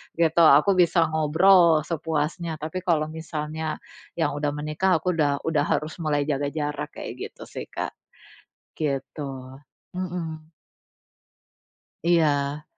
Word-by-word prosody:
gitu, 165 0 +3
aku 155 +7 +6
bisa 170 -1 +4
ngobrol 160 +1 +5
sepuasnya. 160 +1 -2
Tapi, 160 +4 -3
kalau 155 -3 +1
misalnya 155 -1 -4 0.4
yang 165 - 0
udah 145 0 0
menikah, 155 +5 +1
aku 180 - +1
udah 145 -2 +1
udah 155 -3 +1
harus 155 +3 -1
mulai 150 -3 0
jaga 145 0 0
jarak 150 -1 -3
kayak - - -6 0.2
gitu - - -18
sih, - - -6
Kak. - - -4 0.8
Gitu, 145 0 -3 0.7
mhm. 165 -3 -5 1.5
Iya. 150 -4 +2
155 Hz, 115 wpm, -25 LUFS, 150-170 Hz, 1.5 s, aku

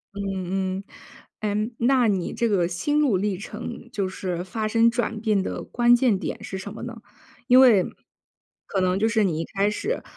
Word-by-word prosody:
嗯 190 -1 -2
嗯。 - - -9 0.6
诶， 215 +2 -1
那 250 0 +3
你 195 -4 -1
这 235 -1 0
个 185 -5 +2
心 185 +13 0
路 280 -9 +3
历 195 0 0
程 230 +4 -8
就 195 -2 -1
是 180 -2 -4
发 215 +4 -3
生 230 +1 +4
转 230 -2 -2
变 215 -3 +2
的 - - -4
关 240 0 +4
键 240 -4 +2
点 215 +2 -5
是 200 -3 -5
什 195 +1 -7
么 - - -9
呢？ 235 -2 -7 0.5
因 255 +1 +7
为 225 -8 +6 0.8
可 190 - -1
能 185 +1 +1
就 220 - +3
是 225 -1 +2
你 170 -5 0
一 165 - -2
开 200 +4 0
始， 410 - -3
210 Hz, 205 characters per minute, -24 LUFS, 190-235 Hz, 0.8 s, 因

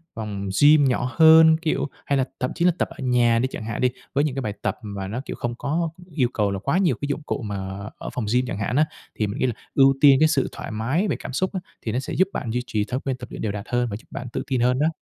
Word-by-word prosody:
phòng 100 -3 -4
gym 145 0 +7
nhỏ 125 0 0
hơn, 160 0 +8
kiểu 155 -3 0 0.2
hay 140 - +1
là 130 - +2
thậm 125 - -1
chí 170 - +1
là 180 - +6
tập - - -1
ở - - -12
nhà 120 -2 +3
đi 130 - +1
chẳng 110 - -6
hạn 115 - -4
đi, 125 - +4 0.2
với 145 0 +2
những 140 -4 -1
cái 135 - -2
bài 105 -5 -3
tập 105 0 -1
mà 100 -3 -5
nó, 115 +6 -4
kiểu, - - -5
không 120 0 -3
có 165 +5 -1 0.2
yêu 130 -5 +1
cầu 105 -2 +1
là 95 - -3
quá 140 - 0
nhiều 180 -9 +2
cái 145 - -2
dụng 145 +2 -2
cụ 140 - -3
mà 105 -3 -4 0.4
ở - - -6
phòng 120 - -2
gym 125 +1 +3
chẳng 100 - -4
hạn 105 +4 -2
á. 155 +2 +4 0.3
Thì 105 - 0
mình 100 - -5
nghĩ - - +2
là 125 - 0 0.2
ưu 135 0 +6
tiên 140 -2 +8
cái 155 - +6
sự 145 -5 +1
thoải - - -7
mái 130 - 0
về 170 - 0
cảm - - -7
xúc 185 +8 0
á 190 - -1 0.2
thì 110 - -3
nó 125 - 0
sẽ - - -5
giúp 185 - +3
bạn 120 -6 -3
duy 125 - 0
trì 105 -4 0
thói 130 +3 -3
quen 135 -2 -3
tập 125 -1 -8
luyện - - -7
đều 110 - -1
đặn 100 0 -5
hơn 120 -1 +1
và 100 - -4
giúp - - -18
bạn 125 - -6
tự - - -2
tin 130 -3 0
hơn 125 +1 +2
đó. 150 - +3
125 Hz, 310 wpm, -23 LUFS, 115-145 Hz, 0.4 s, hơn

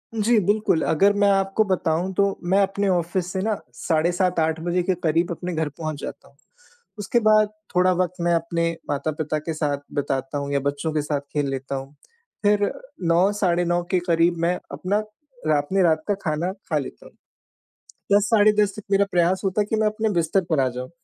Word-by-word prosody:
जी 220 +1 +3
बिल्कुल, 205 -5 +2
अगर 195 +6 +3
मैं 205 0 +3
आपको 195 +2 +2
बताऊँ 180 -1 0
तो 200 - +5 0.3
मैं 195 - +5
अपने 195 +1 -1
ऑफ़िस 175 +1 -1
से 190 - -1
ना 215 +2 0 0.2
साढ़े 165 +1 0
7 180 -1 0
8 160 0 +1
बजे 175 +2 0
के 185 +1 +1
क़रीब 165 +2 +1
अपने 175 +1 -4
घर 160 -1 -1
पहुँच 155 0 -6
जाता - - -8
हूँ, - - -24 0.6
उसके 205 +3 +1
बाद 215 -1 +5 0.3
थोड़ा 180 +1 +4
वक़्त 180 -1 0
मैं 170 0 +2
अपने 170 0 0 0.2
माता-पिता 155 +1 -2
के 160 +2 -4
साथ 150 -2 -1 0.2
बिताता 135 0 -2
हूँ 140 0 -3
या 140 - +2
बच्चों 140 +3 -2
के 150 - +1
साथ 145 -1 -2
खेल 145 -2 0
लेता 135 0 -4
हूँ 135 +1 -7 0.5
फिर 205 0 +3 0.4
9 175 +4 +4
साढ़े 175 -4 +1
9 175 0 +1
के 185 - +3
क़रीब 170 +1 +3
मैं 175 +2 +2 0.2
अपना 195 +3 -1 0.5
रात 145 -2 +2
में 195 - +3
रात 160 -2 +2
का 205 - +2
खाना 165 +4 -1 0.2
खा 155 - +1
लेता 135 - -6
हूँ। - - -14 1.0
10 205 +1 +4
साढ़े 210 0 +6
10 210 -1 +2
बजे 205 - -9
तक - - -23
मेरा 200 0 +4
प्रयास 175 +1 +2
होता 195 +2 +1
है 205 - +1
कि 220 - +1
मैं 215 - +2
अपने 215 +1 0
बिस्तर 175 0 +1
पर 155 -4 +2
आ 130 - +2
जाऊँ। 125 +2 -6
175 Hz, 210 wpm, -23 LUFS, 155-195 Hz, 1.0 s, साढ़े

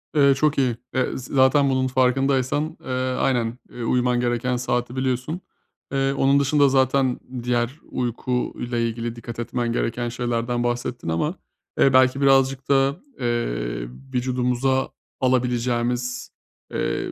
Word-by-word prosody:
Eee, 140 -2 +6
çok 150 +2 +1
iyi, 125 -4 +1 0.2
eee, 130 -1 0
zı 125 - -9
zaten 135 +1 +4
bunun 130 -1 +1
farkındaysan, 135 +4 +1
eee, - - -12 0.3
aynen, 120 -3 0
eee, 120 - -7
uyuman 125 +1 +2
gereken 120 +1 0
saati 120 0 -2
biliyorsun. 130 +6 -2 0.5
Eee, 135 0 +1
onun 140 +1 +3
dışında 140 0 +4
zaten 130 -1 +2 0.2
diğer 120 +3 -1
uyku 125 0 -2
ile 120 -1 -1
ilgili 115 0 -4
dikkat 115 0 -8
etmen 120 0 -2
gereken 120 0 -1
şeylerden 120 0 -1
bahsettin 120 -4 -2
ama, 150 - 0 0.4
eee, 135 - +5
belki 130 +1 +4
birazcık 135 -1 +3
da, 140 +2 +3 0.2
eee, - - -2 0.3
vücudumuza 125 +1 0 0.3
alabileceğimiz, 125 -1 0 0.4
eee, - - -2
125 Hz, 130 wpm, -23 LUFS, 120-135 Hz, 0.5 s, Eee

